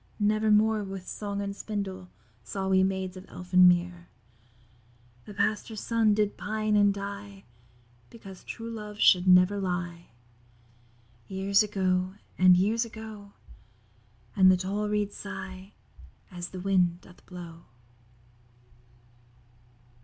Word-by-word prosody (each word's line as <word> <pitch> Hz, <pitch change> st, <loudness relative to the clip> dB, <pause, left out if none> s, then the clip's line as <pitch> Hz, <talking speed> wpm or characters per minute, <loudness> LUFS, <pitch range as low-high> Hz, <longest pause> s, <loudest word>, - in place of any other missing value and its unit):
Never 215 Hz, +1 st, +2 dB
more 215 Hz, 0 st, +3 dB
with 195 Hz, -2 st, -7 dB
song 200 Hz, -1 st, -4 dB
and 200 Hz, 0 st, -4 dB
spindle 195 Hz, -4 st, -5 dB, 0.3 s
Saw 190 Hz, -, -4 dB
we 190 Hz, 0 st, +4 dB
Maids 190 Hz, -1 st, -1 dB
of 185 Hz, -, -11 dB
Elfin 180 Hz, 0 st, +4 dB
Mere, 175 Hz, 0 st, +1 dB, 1.2 s
The 210 Hz, -, -10 dB
Pastor's 215 Hz, +1 st, -1 dB
Son 225 Hz, -2 st, +2 dB
did 210 Hz, -1 st, 0 dB
pine 215 Hz, 0 st, -1 dB
and 205 Hz, -1 st, +5 dB
die; 200 Hz, 0 st, -7 dB, 0.7 s
Because 195 Hz, -5 st, -12 dB
true 230 Hz, 0 st, -7 dB
love 210 Hz, -2 st, -8 dB
should 180 Hz, -3 st, +5 dB
never 180 Hz, +2 st, +5 dB
lie. 175 Hz, -2 st, -4 dB, 1.2 s
Years 195 Hz, +1 st, +2 dB
ago, 185 Hz, -2 st, 0 dB, 0.2 s
and 185 Hz, -1 st, +6 dB
years 215 Hz, +5 st, +2 dB
ago; 220 Hz, -3 st, -10 dB, 1.0 s
And 185 Hz, -1 st, +7 dB
the 185 Hz, -, +3 dB
tall 200 Hz, +3 st, -2 dB
reeds 210 Hz, -1 st, -1 dB
sigh 190 Hz, -1 st, -8 dB, 0.6 s
as 175 Hz, -1 st, -6 dB
the 185 Hz, -, -8 dB
wind 180 Hz, -2 st, +1 dB
doth 180 Hz, -, -18 dB
blow. 170 Hz, -2 st, -10 dB
195 Hz, 120 wpm, -28 LUFS, 185-210 Hz, 1.2 s, And